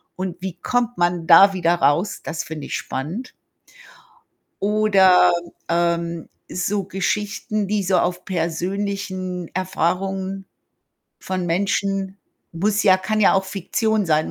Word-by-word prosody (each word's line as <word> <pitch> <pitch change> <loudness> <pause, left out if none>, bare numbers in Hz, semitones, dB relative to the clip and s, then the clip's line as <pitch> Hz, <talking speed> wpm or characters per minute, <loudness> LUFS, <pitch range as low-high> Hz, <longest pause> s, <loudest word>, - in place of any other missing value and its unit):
und 185 -1 -5
wie 185 -2 -5
kommt 245 -1 0
man 175 -1 +1
da 195 +3 +8
wieder 175 -2 +2
raus? 170 +4 +1
Das 165 0 -4
finde 155 -3 -7
ich - - -3
spannend. 175 - -5 1.3
Oder, 200 -3 +5 0.4
ähm, 170 -1 -1 0.2
so 195 +3 -1
Geschichten, 205 +2 -2
die 210 0 0
so 185 0 +2
auf 180 0 -1
persönlichen 185 +1 -3
Erfahrungen 190 +1 -2 0.7
von 185 -1 -3
Menschen 195 +2 -1 0.3
muss 205 +5 0
ja 190 -3 +6
kann 215 +3 -2
ja 200 - +5
auch 195 - +2
Fiktion 205 +2 -1
sein, 155 -1 +1
190 Hz, 120 wpm, -21 LUFS, 175-200 Hz, 1.3 s, da